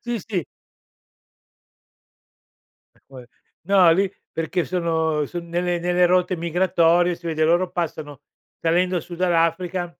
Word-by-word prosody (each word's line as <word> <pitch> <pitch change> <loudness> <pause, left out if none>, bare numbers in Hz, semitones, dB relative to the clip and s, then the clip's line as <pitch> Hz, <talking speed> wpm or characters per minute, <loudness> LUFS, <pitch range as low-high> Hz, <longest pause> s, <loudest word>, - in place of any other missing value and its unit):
sì, 240 -1 -3
sì. 190 -6 -2 2.5
E - - -28
poi 130 -2 -12 0.4
no, 190 -3 +5
lì 190 +3 +1 0.2
perché 165 +2 -2
sono 160 -4 -1
son 170 +3 -7
nelle 175 +1 -1
nelle 180 +1 +2
rotte 180 +1 +1
migratorie 175 0 +2
si 170 - -12
vede, 160 -1 0
loro 175 +3 +2
passano 155 -5 -5 0.4
salendo 180 +2 +1
su 175 +2 -10
dall'Africa. 175 0 0
175 Hz, 120 wpm, -22 LUFS, 165-180 Hz, 2.5 s, no